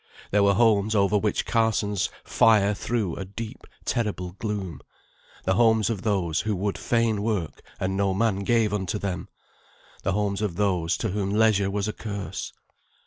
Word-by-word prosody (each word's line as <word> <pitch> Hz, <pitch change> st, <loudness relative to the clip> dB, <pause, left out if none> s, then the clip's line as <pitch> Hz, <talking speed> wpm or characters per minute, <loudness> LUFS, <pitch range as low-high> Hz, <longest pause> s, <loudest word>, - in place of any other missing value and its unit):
There 105 Hz, -, +4 dB
were 100 Hz, 0 st, +4 dB
homes 110 Hz, -1 st, +3 dB
over 100 Hz, 0 st, +3 dB
which 105 Hz, 0 st, +1 dB
Carsons' 110 Hz, -3 st, +1 dB
fire 105 Hz, -2 st, +4 dB
threw 105 Hz, -4 st, -2 dB
a -, -, -4 dB
deep, 110 Hz, +5 st, -7 dB, 0.2 s
terrible 105 Hz, -7 st, -1 dB
gloom; 95 Hz, -6 st, -4 dB, 0.6 s
the 95 Hz, -, +2 dB
homes 110 Hz, +1 st, +3 dB
of 105 Hz, -5 st, -3 dB
those 95 Hz, -7 st, 0 dB
who 110 Hz, -1 st, -1 dB
would 100 Hz, +2 st, -1 dB
fain 115 Hz, -3 st, +1 dB
work, 105 Hz, -7 st, -2 dB, 0.2 s
and 95 Hz, 0 st, -1 dB
no 100 Hz, -1 st, +1 dB
man 105 Hz, -1 st, +1 dB
gave 110 Hz, 0 st, +2 dB
unto 95 Hz, -1 st, -1 dB
them 95 Hz, -4 st, -4 dB, 0.7 s
the 95 Hz, -, 0 dB
homes 100 Hz, 0 st, 0 dB
of 105 Hz, -5 st, -1 dB
those 90 Hz, -4 st, +1 dB
to 110 Hz, -, -2 dB
whom 100 Hz, 0 st, -1 dB
leisure 105 Hz, -2 st, +3 dB
was 100 Hz, +1 st, -1 dB
a 105 Hz, -, -2 dB
curse. 100 Hz, -3 st, -5 dB
100 Hz, 165 wpm, -25 LUFS, 95-110 Hz, 0.7 s, There